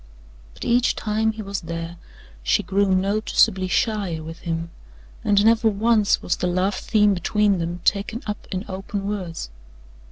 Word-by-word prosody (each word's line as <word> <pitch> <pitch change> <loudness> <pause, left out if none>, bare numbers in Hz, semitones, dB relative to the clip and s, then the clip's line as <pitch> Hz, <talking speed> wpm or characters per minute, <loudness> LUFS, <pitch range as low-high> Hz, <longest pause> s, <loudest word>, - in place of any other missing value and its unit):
But - - -7
each 245 +1 +3
time 220 +1 0
he 215 0 -6
was 200 -1 -4
there 165 0 -6 0.4
she - - +2
grew 200 0 +1
noticeably 195 0 +2
shyer 190 -5 0
with 165 +1 -8
him 165 0 -4 0.5
and 205 0 +3
never 225 0 +4
once 215 0 +2
was - - 0
the 180 - -1
love 185 +3 +1
theme 210 +1 +2
between 200 +1 +1
them 170 +1 -3
taken 215 +6 0
up 210 -1 -5
in 190 +2 -3
open 195 +1 -5
words. 180 - -4
200 Hz, 155 wpm, -23 LUFS, 175-215 Hz, 0.5 s, never